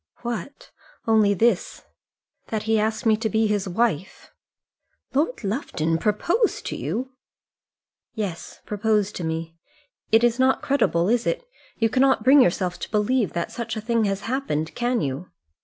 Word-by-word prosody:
"What? 240 +4 -6 0.3
Only 215 -3 +4
this, 220 -2 +1 0.6
that 220 -2 -3
he 220 0 +2
asked 220 +2 -1
me 220 -1 +5
to 220 0 -1
be 220 +2 +2
his 205 -2 0
wife." 190 -3 -1 0.8
"Lord 295 - 0
Lufton 165 - -1
proposed 340 - 0
to - - -3
you?" 255 +2 -3 1.0
"Yes; 200 -7 -5
proposed 210 -1 0
to 180 - -5
me. 165 0 -4 0.5
It 225 +1 +5
is 240 +1 +2
not 260 +1 +3
credible, 210 -11 +2
is 240 +2 +1
it? - - -2 0.3
You 225 - +3
cannot 265 +4 +3
bring 270 +2 +7
yourself 180 -4 +1
to - - -6
believe 215 +1 +1
that 170 0 -3
such 235 -1 -4
a - - -3
thing 230 0 +1
happened, 195 - -2
can 240 -1 0
you?" 140 +6 -4
220 Hz, 150 wpm, -24 LUFS, 195-240 Hz, 1.0 s, bring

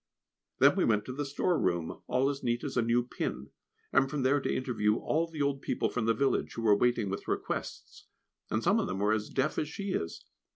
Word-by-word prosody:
Then - - +6
we - - +2
went 105 -2 +2
to 130 - -5
the 145 +1 -3
storeroom, 90 - 0
all 125 +2 +2
as 140 -1 -2
neat 120 0 -1
as 140 - -4
a 125 - +3
new 120 +1 +2
pin; - - -4 0.4
and 135 - +4
from 145 -2 -2
there 140 +2 +3
to - - -1
interview 110 -5 +1
all 160 +7 0
the 155 -3 -3
old 140 -1 -1
people - - -1
from 120 -3 -2
the 115 - +3
village, 135 +4 0
who 115 - -4
were 105 -2 +6
waiting 120 -1 +2
with 95 +1 -4
requests, - - -4 0.4
and - - -1
some - - +3
of - - -1
them 95 - -3
were 105 +2 +2
as 110 -1 -2
deaf 135 +3 0
as 150 - -2
she 200 +4 -4
is. 85 - -3
125 Hz, 225 wpm, -30 LUFS, 110-140 Hz, 0.4 s, Then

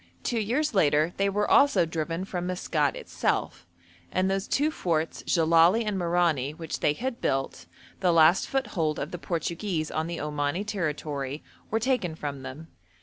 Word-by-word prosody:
Two 235 - 0
years 255 +8 0
later 155 -2 +3
they 200 0 +2
were 210 +1 0
also 280 -11 +5
driven 165 +2 -3
from 180 -2 -4
Maskat 160 -5 0
itself, 85 +1 -2 0.4
and 185 +1 +1
those 195 0 -1
two 300 +3 +1
forts 165 - -1
Jellali 170 +6 +4
and 210 -1 -1
Merani 170 -6 +1
which 165 -2 -5
they 145 - +2
had 245 - -4
built, 135 -11 -2 0.3
the 180 -2 +3
last 165 +2 +5
foothold 195 - -1
of 145 - -4
the 175 - -5
Portuguese 170 0 -2
on 160 +1 -1
the 170 0 -4
Omani 150 +5 -2
territory, 150 -7 -3 0.3
were 225 - +1
taken 225 -9 0
from 145 -3 -5
them. 150 +5 -9
170 Hz, 160 wpm, -27 LUFS, 150-195 Hz, 0.4 s, also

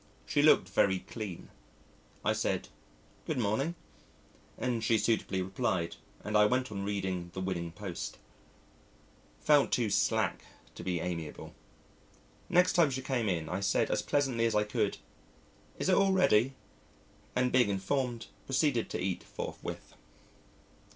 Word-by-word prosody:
She - - +2
looked - - +6
very 95 -1 +2
clean. 100 -2 -7 0.8
I - - +3
said, - - -1 0.6
"Good - - -1
morning," 125 +9 0 0.8
and 120 -3 -1
she 115 0 +3
suitably 105 -4 0
replied, 95 -3 -1 0.3
and 105 - -3
I 105 0 +6
went 125 +1 0
on 100 -2 -4
reading, 95 -3 -2
the - - -3
Winning 90 -3 -3
Post. 95 -1 -6 1.2
Felt 145 -2 +4
too 115 -4 +1
slack - - +1 0.3
to - - -9
be 90 -2 -1
amiable. 85 -3 -5 1.0
Next 180 +1 +4
time 170 -4 +5
she 130 0 -3
came 125 -5 0
in, 80 -4 -1
I 90 - -2
said 100 0 +1
as - - +1
pleasantly 130 -5 +1
as 110 - -1
I 105 - +4
could, 105 - -1 0.8
"Is - - -2
it 190 - +4
all 195 0 +4
ready?" 135 - +4 0.8
and 125 0 +2
being 125 -5 +4
informed 115 +4 -1 0.2
proceeded 135 -3 +1
to - - -3
eat 95 -1 -2
forthwith. - - -7
110 Hz, 140 wpm, -31 LUFS, 95-130 Hz, 1.2 s, looked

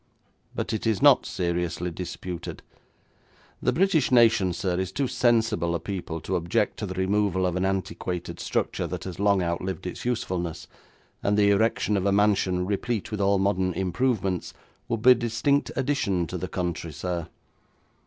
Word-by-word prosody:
But - - -2
it 110 +1 -2
is 110 -3 +1
not 140 -2 +6
seriously 85 -1 -2
disputed. 90 0 -6 1.0
The - - +2
British 175 -7 +2
nation, 115 -6 +5
sir, 90 +1 -1
is 95 -1 -2
too 140 -2 -1
sensible 115 -9 +2
a - - -1
people 85 -2 -5
to 95 - -2
object 85 0 0
to - - -4
the 95 - -5
removal 95 0 +1
of 90 -1 0
an 95 +1 0
antiquated 95 -2 -3
structure - - -1
that - - -5
has 95 -2 -7
long 100 -2 +3
outlived 90 +2 -3
its 90 - -5
usefulness, 90 -9 -2 0.5
and 105 +1 +1
the 100 -1 +5
erection 105 0 +2
of 95 +1 0
a - - +3
mansion 100 -3 +2
replete 105 +3 -2
with 105 -1 -2
all 100 0 +3
modern 95 -1 +1
improvements 95 +1 -1 0.3
would 115 -2 -2
be 130 - +9
a - - +11
distinct 120 +4 0
addition 125 -10 0
to - - -5
the - - -3
country, 85 -2 -3
sir. 85 +2 -4
95 Hz, 165 wpm, -26 LUFS, 90-110 Hz, 1.0 s, a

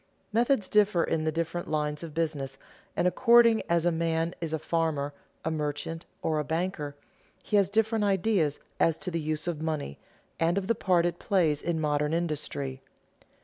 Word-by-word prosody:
Methods 235 -2 +2
differ 205 -5 +3
in 155 -1 0
the 155 - +1
different 165 +2 -3
lines 150 -1 -1
of 160 -3 -8
business, 145 -5 -2 0.4
and 180 - +3
according 230 +2 +5
as 170 0 +2
a 175 - +4
man 165 0 0
is 165 -2 -3
a 160 - 0
farmer, 155 -3 -1 0.3
a 160 - 0
merchant, 155 +2 -3 0.2
or 155 -1 +1
a - - 0
banker, 160 -1 -2 0.5
he 210 - -1
has 200 -2 +4
different 220 +1 +2
ideas 195 -6 +1 0.2
as 165 -1 +3
to 180 - -5
the 165 -1 -1
use 155 +1 -2
of 165 -3 -2
money 155 - -3 0.4
and 170 +3 +2
of 195 - 0
the 230 - +2
part 180 -5 +2
it 175 0 -1
plays 160 -7 +2
in 170 -1 -1
modern 150 0 +1
industry. 145 -5 -3
165 Hz, 180 wpm, -28 LUFS, 150-185 Hz, 0.5 s, according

